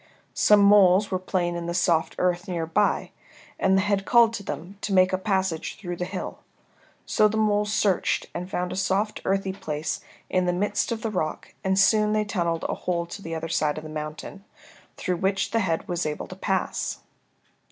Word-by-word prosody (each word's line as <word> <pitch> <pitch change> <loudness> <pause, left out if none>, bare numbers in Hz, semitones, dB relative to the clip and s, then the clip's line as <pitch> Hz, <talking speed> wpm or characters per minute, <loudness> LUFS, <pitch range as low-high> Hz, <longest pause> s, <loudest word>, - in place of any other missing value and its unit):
Some 210 -1 +5
moles 200 -1 +6
were 185 - 0
playing 180 -2 -1
in 170 0 -4
the 170 - -2
soft 170 -3 +1
earth 180 +1 0
near 170 -3 -2
by, 205 +6 +1 0.5
and 190 0 +3
the 190 - +2
head 200 -1 +1
called 235 +1 +5
to 225 - -4
them 195 0 -7
to 200 - -2
make 185 0 +4
a - - +5
passage 190 -5 -1
through 175 -4 -5
the 180 - -2
hill. 185 +1 -6 0.7
So 215 - +4
the 215 +1 -2
moles 210 -1 +2
searched 205 -3 +1
and 180 +1 -5
found 180 -1 -2
a - - -4
soft 195 +3 0
earthy 195 0 0
place 155 -4 -3 0.3
in 185 -1 +1
the 180 - +2
midst 205 +5 0
of 230 -1 -3
the 225 - -1
rock 155 -6 -3
and 190 0 +1
soon 210 +2 +4
they 215 0 +1
tunnelled 170 -5 -1
a - - -2
hole 170 -1 -2
to 200 +4 -9
the 165 -3 -5
other 160 0 -4
side 155 -2 0
of 155 - -6
the 155 - -8
mountain, 155 +5 -6 0.5
through 180 -2 -1
which 195 +2 0
the 230 - +2
head 170 -6 -1
was 175 -2 -1
able 150 - -4
to 185 - -8
pass. 190 0 -2
190 Hz, 205 wpm, -25 LUFS, 175-205 Hz, 0.7 s, moles